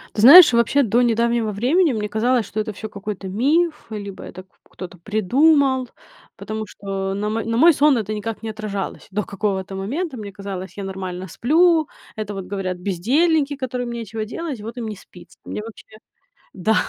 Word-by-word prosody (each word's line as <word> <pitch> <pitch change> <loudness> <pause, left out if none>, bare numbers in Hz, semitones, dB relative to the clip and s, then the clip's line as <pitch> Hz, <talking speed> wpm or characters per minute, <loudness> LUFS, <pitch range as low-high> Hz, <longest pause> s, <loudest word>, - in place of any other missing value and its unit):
Ты 210 - 0
знаешь, 310 +8 +10
вообще 235 +4 +3
до 235 +1 +2
недавнего 235 -1 +1
времени 270 - +2
мне 210 -2 -3
казалось, 230 +2 +1
что 215 - -5
это 215 - -2
всё 220 +2 -7
какой-то 200 -1 -6
миф, 300 - +1
либо 200 -2 -7
это 185 - -9
к 190 - -35 0.3
кто-то 180 -1 -9
придумал, 260 - +3 0.5
потому 215 0 -5
что 195 -1 -4
на 210 +1 -2
мо 225 +1 -2
на 230 0 -2
мой 330 +6 +7
сон 285 -2 +4
это 215 -1 -3
никак 215 +1 -5
не 225 - -4
отражалось 215 -3 -5
до 210 +2 -1
какого-то 195 -1 -3
момента. 260 - -3
Мне 205 -2 -7
казалось, 195 -1 -7
я 200 - -4
нормально 190 -1 -5
сплю, 320 - +3 0.3
это 210 -1 -4
вот 195 -2 -6
говорят 185 -2 -3
бездельники, 275 - +1
которым 250 -2 -4
нечего 225 -2 -5
делать, 280 0 -5
вот 225 +3 -8
им 235 -2 -4
не 215 - -5
спится. 180 -2 -17
Мне, - - -5
вообще 225 0 -11 0.7
Да, 195 +4 +1
220 Hz, 180 wpm, -21 LUFS, 200-255 Hz, 0.7 s, знаешь